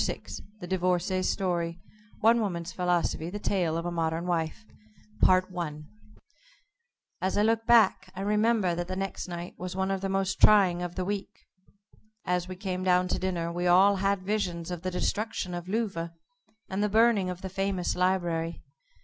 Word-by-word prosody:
VI -, -, -2 dB, 0.4 s
THE 180 Hz, -, -7 dB
DIVORCÉE'S 185 Hz, 0 st, 0 dB
STORY 175 Hz, -3 st, -1 dB, 0.4 s
ONE 230 Hz, +2 st, +5 dB
WOMAN'S 175 Hz, -4 st, -3 dB
PHILOSOPHY 175 Hz, -2 st, 0 dB
THE 205 Hz, -, -5 dB
TALE 180 Hz, -6 st, 0 dB
OF 170 Hz, -, -3 dB
A 175 Hz, -, -2 dB
MODERN 165 Hz, 0 st, -1 dB
WIFE 160 Hz, -11 st, -2 dB, 2.6 s
As 190 Hz, +2 st, 0 dB
I 205 Hz, -, +4 dB
look 225 Hz, +1 st, +1 dB
back, 225 Hz, -5 st, +4 dB
I 190 Hz, -, -5 dB
remember 210 Hz, -2 st, +2 dB
that 175 Hz, 0 st, -3 dB
the 185 Hz, -, -4 dB
next 195 Hz, 0 st, -4 dB
night 175 Hz, 0 st, -6 dB
was 180 Hz, 0 st, -5 dB
one 190 Hz, 0 st, 0 dB
of 195 Hz, -1 st, -2 dB
the 195 Hz, -, -2 dB
most 195 Hz, 0 st, -1 dB
trying 190 Hz, -4 st, +6 dB
of 175 Hz, 0 st, -4 dB
the 185 Hz, -, -2 dB
week. 200 Hz, 0 st, -5 dB, 0.8 s
As 180 Hz, 0 st, 0 dB
we 185 Hz, -, -6 dB
came 185 Hz, -1 st, -4 dB
down 180 Hz, 0 st, +3 dB
to -, -, 0 dB
dinner 175 Hz, -3 st, -2 dB
we 175 Hz, +1 st, -1 dB
all 195 Hz, +3 st, +6 dB
had 195 Hz, 0 st, 0 dB
visions 180 Hz, -4 st, -2 dB
of 175 Hz, -2 st, -4 dB
the 185 Hz, -, -2 dB
destruction 185 Hz, 0 st, -2 dB
of 175 Hz, 0 st, -5 dB
Louvain, 195 Hz, -6 st, -1 dB, 0.6 s
and 190 Hz, +1 st, -2 dB
the 210 Hz, -, +1 dB
burning 220 Hz, -3 st, +3 dB
of 180 Hz, +1 st, -6 dB
the -, -, -3 dB
famous 195 Hz, -1 st, -1 dB
library. 175 Hz, -3 st, 0 dB
185 Hz, 170 wpm, -28 LUFS, 175-195 Hz, 2.6 s, trying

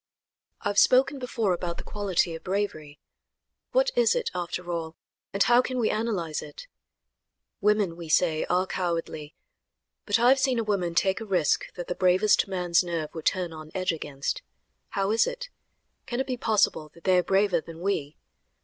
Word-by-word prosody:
I -, -, -1 dB
have 200 Hz, 0 st, +3 dB
spoken 270 Hz, +2 st, +4 dB
before 230 Hz, -6 st, 0 dB
about 175 Hz, -1 st, -3 dB
the -, -, -7 dB
quality 190 Hz, -4 st, -1 dB
of 165 Hz, 0 st, -8 dB
bravery. 180 Hz, -7 st, -3 dB, 0.7 s
What -, -, +3 dB
is 485 Hz, 0 st, +4 dB
it, 475 Hz, -2 st, -1 dB
after 175 Hz, 0 st, -4 dB
all, 165 Hz, -1 st, -4 dB, 0.4 s
and 200 Hz, -, +2 dB
how 240 Hz, 0 st, +5 dB
can 255 Hz, 0 st, -4 dB
we 230 Hz, -3 st, +1 dB
analyze 200 Hz, -8 st, -2 dB
it? 150 Hz, -, -10 dB, 0.9 s
Women, 205 Hz, -4 st, +2 dB
we 170 Hz, -2 st, -9 dB
say, 155 Hz, -1 st, +2 dB
are 180 Hz, +1 st, +1 dB
cowardly, 165 Hz, -5 st, -3 dB, 0.7 s
but 205 Hz, +1 st, +3 dB
I 240 Hz, +2 st, +4 dB
have 270 Hz, +1 st, +5 dB
seen 260 Hz, -2 st, +1 dB
a 230 Hz, -, +1 dB
woman 185 Hz, -5 st, -1 dB
take 190 Hz, +4 st, +2 dB
a -, -, -3 dB
risk 180 Hz, -7 st, +1 dB
that 175 Hz, -1 st, -6 dB
the -, -, -1 dB
bravest 185 Hz, +4 st, +3 dB
man's 180 Hz, -2 st, +1 dB
nerve 165 Hz, -3 st, -4 dB
would 160 Hz, -2 st, -4 dB
turn 180 Hz, -3 st, 0 dB
on 155 Hz, -1 st, -9 dB
edge 185 Hz, -1 st, +1 dB
against. 145 Hz, -4 st, -4 dB, 0.5 s
How 195 Hz, +1 st, -1 dB
is 225 Hz, -, +3 dB
it? -, -, -5 dB, 0.6 s
Can 240 Hz, 0 st, -3 dB
it 265 Hz, -, 0 dB
be 255 Hz, -1 st, -2 dB
possible 210 Hz, -9 st, +1 dB
that 170 Hz, -, -17 dB
they 185 Hz, -1 st, +4 dB
are -, -, +1 dB
braver 195 Hz, -3 st, +2 dB
than 165 Hz, 0 st, -11 dB
we? 170 Hz, -6 st, -2 dB
185 Hz, 185 wpm, -26 LUFS, 170-220 Hz, 0.9 s, how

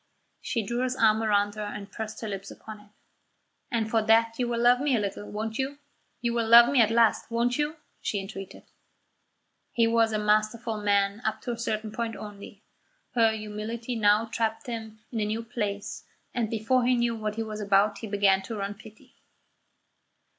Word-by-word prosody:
She 230 Hz, -5 st, -2 dB
drew 235 Hz, +4 st, -2 dB
his 255 Hz, 0 st, 0 dB
arm 220 Hz, -3 st, +4 dB
towards 205 Hz, -1 st, +1 dB
her -, -, -3 dB
and 205 Hz, -1 st, -7 dB
pressed 220 Hz, +1 st, -6 dB
her 220 Hz, -, -4 dB
lips 195 Hz, -1 st, -5 dB
upon 215 Hz, -1 st, -10 dB
it. 210 Hz, 0 st, -19 dB, 0.8 s
"And 230 Hz, -4 st, 0 dB
for 225 Hz, 0 st, +2 dB
that 225 Hz, +1 st, +3 dB
you 245 Hz, -, +1 dB
will 235 Hz, -1 st, -1 dB
love 245 Hz, +1 st, +5 dB
me 280 Hz, -2 st, +2 dB
a -, -, +2 dB
little, 205 Hz, 0 st, -4 dB
won't 220 Hz, +3 st, -4 dB
you? 270 Hz, +2 st, -2 dB, 0.4 s
You 235 Hz, -1 st, 0 dB
will 230 Hz, -1 st, 0 dB
love 235 Hz, +2 st, +8 dB
me 270 Hz, -4 st, +5 dB
at 220 Hz, -, +4 dB
last, 230 Hz, -1 st, +3 dB
won't 240 Hz, +3 st, 0 dB
you?" 295 Hz, +2 st, 0 dB, 0.3 s
she 205 Hz, -, -1 dB
entreated. 195 Hz, -1 st, -8 dB, 1.1 s
He 230 Hz, -, +3 dB
was 230 Hz, 0 st, +3 dB
a 215 Hz, -, 0 dB
masterful 215 Hz, +1 st, 0 dB
man 200 Hz, +1 st, +1 dB
up 220 Hz, -, -1 dB
to 245 Hz, -, -3 dB
a 235 Hz, -, -4 dB
certain 220 Hz, -2 st, -2 dB
point 230 Hz, 0 st, -3 dB
only. 205 Hz, 0 st, -10 dB, 0.5 s
Her 230 Hz, -2 st, +4 dB
humility 220 Hz, +3 st, -5 dB
now 210 Hz, 0 st, +4 dB
tapped 225 Hz, +1 st, -2 dB
him 220 Hz, -3 st, -6 dB
in 230 Hz, -, -2 dB
a 210 Hz, -, +1 dB
new 220 Hz, +2 st, -2 dB
place, 210 Hz, -4 st, -4 dB, 0.3 s
and 235 Hz, -3 st, -1 dB
before 230 Hz, +3 st, +1 dB
he 250 Hz, +1 st, +3 dB
knew 235 Hz, -1 st, +1 dB
what 215 Hz, -1 st, -3 dB
he 225 Hz, -, -2 dB
was 215 Hz, -1 st, -6 dB
about 200 Hz, +1 st, +3 dB
he 225 Hz, -, -6 dB
began 200 Hz, -2 st, +3 dB
to 225 Hz, +4 st, -6 dB
run 200 Hz, 0 st, -3 dB
pity. 215 Hz, +1 st, -16 dB
220 Hz, 195 wpm, -27 LUFS, 210-235 Hz, 1.1 s, love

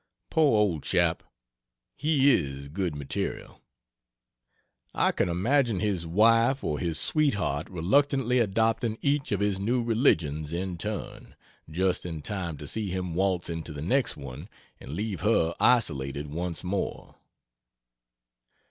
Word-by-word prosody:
Poor 150 Hz, -8 st, +4 dB
old 95 Hz, -8 st, +1 dB
chap, 85 Hz, 0 st, +1 dB, 0.7 s
he 145 Hz, -2 st, +3 dB
is 70 Hz, -, -1 dB
good 90 Hz, 0 st, -2 dB
material. 70 Hz, -1 st, -5 dB, 1.3 s
I -, -, +3 dB
can -, -, 0 dB
imagine 115 Hz, +4 st, +1 dB
his 95 Hz, -5 st, -1 dB
wife 115 Hz, +8 st, +4 dB
or 75 Hz, -, -1 dB
his 85 Hz, -3 st, -1 dB
sweetheart 100 Hz, -, 0 dB
reluctantly 125 Hz, -, +2 dB
adopting 115 Hz, +1 st, +1 dB
each 140 Hz, 0 st, +1 dB
of 100 Hz, -1 st, 0 dB
his 100 Hz, -2 st, 0 dB
new 120 Hz, +5 st, 0 dB
religious 80 Hz, -, +1 dB
in 90 Hz, 0 st, -3 dB
turn, 105 Hz, +3 st, -6 dB, 0.3 s
just 90 Hz, +3 st, 0 dB
in 80 Hz, -4 st, -6 dB
time 90 Hz, -5 st, -4 dB
to 75 Hz, -, -8 dB
see 105 Hz, +4 st, -2 dB
him 90 Hz, -2 st, -3 dB
waltz 95 Hz, 0 st, 0 dB
into 80 Hz, -1 st, -5 dB
the 75 Hz, 0 st, -6 dB
next 130 Hz, -, +1 dB
one 70 Hz, -, -9 dB, 0.3 s
and 70 Hz, -, -9 dB
leave 100 Hz, -1 st, -3 dB
her 90 Hz, -5 st, +2 dB
isolated 75 Hz, -, +1 dB
once 85 Hz, 0 st, -3 dB
more. 95 Hz, +2 st, -4 dB
95 Hz, 130 wpm, -27 LUFS, 80-115 Hz, 1.3 s, Poor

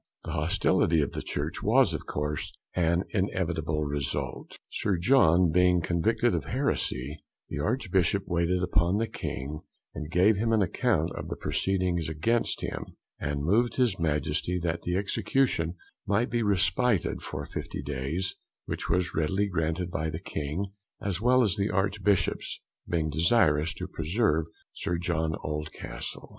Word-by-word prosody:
The -, -, -5 dB
hostility 85 Hz, +1 st, +2 dB
of 70 Hz, -, -1 dB
the -, -, -4 dB
church 75 Hz, +4 st, -3 dB
was, -, -, +4 dB
of -, -, -5 dB
course, 75 Hz, +5 st, -2 dB, 0.2 s
an 85 Hz, 0 st, +2 dB
inevitable 85 Hz, -6 st, 0 dB
result. 70 Hz, -2 st, -3 dB
Sir 95 Hz, -3 st, 0 dB
John 85 Hz, -4 st, +5 dB
being 90 Hz, +1 st, +4 dB
convicted 90 Hz, +8 st, +1 dB
of -, -, -1 dB
heresy, 75 Hz, -, -1 dB, 0.3 s
the 80 Hz, -, -4 dB
Archbishop 95 Hz, -, +1 dB
waited 90 Hz, +1 st, +1 dB
upon 90 Hz, 0 st, +2 dB
the 115 Hz, -, +1 dB
King, 75 Hz, -7 st, -5 dB, 0.3 s
and 75 Hz, -1 st, -6 dB
gave 95 Hz, +5 st, +4 dB
him 115 Hz, +2 st, +1 dB
an 110 Hz, -2 st, +4 dB
account 90 Hz, -3 st, +1 dB
of -, -, -5 dB
the -, -, -4 dB
proceedings 90 Hz, -4 st, 0 dB
against 110 Hz, +10 st, 0 dB
him, -, -, -5 dB, 0.2 s
and 70 Hz, 0 st, -2 dB
moved 115 Hz, +9 st, +2 dB
his 120 Hz, -8 st, +2 dB
Majesty 80 Hz, +2 st, 0 dB
that 85 Hz, 0 st, -1 dB
the 90 Hz, -, -1 dB
execution 100 Hz, -4 st, +1 dB, 0.3 s
might 110 Hz, +4 st, +1 dB
be 120 Hz, 0 st, +1 dB
respited 100 Hz, 0 st, +2 dB
for -, -, -5 dB
50 -, -, -5 dB
days, 75 Hz, +8 st, -2 dB, 0.3 s
which -, -, -4 dB
was 85 Hz, 0 st, +1 dB
readily 95 Hz, +6 st, +1 dB
granted 85 Hz, 0 st, -1 dB
by 80 Hz, +1 st, -1 dB
the 80 Hz, 0 st, -4 dB
King, 80 Hz, +5 st, -3 dB, 0.3 s
as 100 Hz, -2 st, -2 dB
well 125 Hz, +2 st, +5 dB
as 100 Hz, -6 st, +1 dB
the 100 Hz, +1 st, +1 dB
Archbishops, 100 Hz, 0 st, +1 dB, 0.3 s
being 80 Hz, -3 st, 0 dB
desirous 80 Hz, -1 st, +3 dB
to -, -, -5 dB
preserve 80 Hz, -1 st, +1 dB, 0.3 s
Sir 85 Hz, -, -2 dB
John 80 Hz, -2 st, 0 dB
Oldcastle. 75 Hz, 0 st, -5 dB
85 Hz, 150 wpm, -28 LUFS, 80-100 Hz, 0.3 s, John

